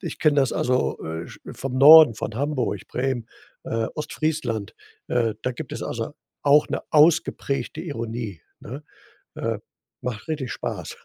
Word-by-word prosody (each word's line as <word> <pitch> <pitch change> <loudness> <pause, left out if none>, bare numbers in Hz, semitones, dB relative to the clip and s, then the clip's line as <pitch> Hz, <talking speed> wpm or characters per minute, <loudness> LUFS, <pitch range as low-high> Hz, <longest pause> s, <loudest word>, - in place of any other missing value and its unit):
ich 170 - -6
kenne 150 -2 +3
das 135 -2 +3
also, 125 +1 0
äh, 80 +1 -5
sch - - -13
vom 135 -1 -5
Norden, 150 -2 +9
von 110 +1 -5
Hamburg, 140 -2 -2
Bremen, 125 -2 -2 0.4
äh, 115 0 -1
Ostfriesland, 150 -9 -2 0.3
äh, 115 -3 +1
da 125 - 0
gibt 135 +3 -8
es - - -5
also 115 +5 -4 0.3
auch 145 +1 +5
'ne - - -2
ausgeprägte 155 -2 +2
Ironie, 115 - -5 0.2
ne? 140 +7 -8 0.5
Äh, - - -2 0.4
macht 115 -4 -5
richtig 145 -6 -3
Spaß. - - -5
130 Hz, 145 wpm, -24 LUFS, 115-150 Hz, 0.5 s, Norden